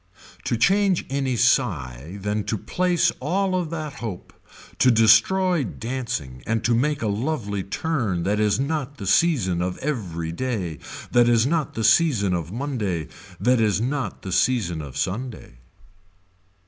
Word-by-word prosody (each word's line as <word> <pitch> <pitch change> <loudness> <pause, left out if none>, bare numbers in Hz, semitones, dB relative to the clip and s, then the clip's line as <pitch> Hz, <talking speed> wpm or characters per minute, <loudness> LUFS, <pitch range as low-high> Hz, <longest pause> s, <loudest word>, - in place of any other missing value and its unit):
To 120 - 0
change 195 - +2
any 135 -2 0
sigh, 85 - 0
then 105 +2 -2
to 110 - -1
place 180 - +1
all 185 +8 0
of 180 -3 -1
that 155 -3 -5
hope, 115 -9 -7 0.5
to 130 - +5
destroy 135 - +4
dancing 110 - -4
and 110 0 0
to 120 - +2
make 140 +3 +1
a - - 0
lovely 105 -2 -2
turn 105 - -2
that 105 +3 0
is 105 +1 +2
not 145 -1 -2
the 100 - -7
season 95 - +2
of 90 0 -2
every 90 - -3
day, 90 - -3 0.3
that 120 -1 +5
is 115 -1 +4
not 155 0 -1
the 115 - -2
season 110 - +3
of 85 -1 -3
Monday, 105 - -3 0.3
that 120 +4 +3
is 105 -4 +2
not 125 -3 -3
the 95 - -5
season 95 -4 +1
of 70 -3 -8
Sunday. 105 - -4
115 Hz, 150 wpm, -23 LUFS, 95-140 Hz, 0.5 s, to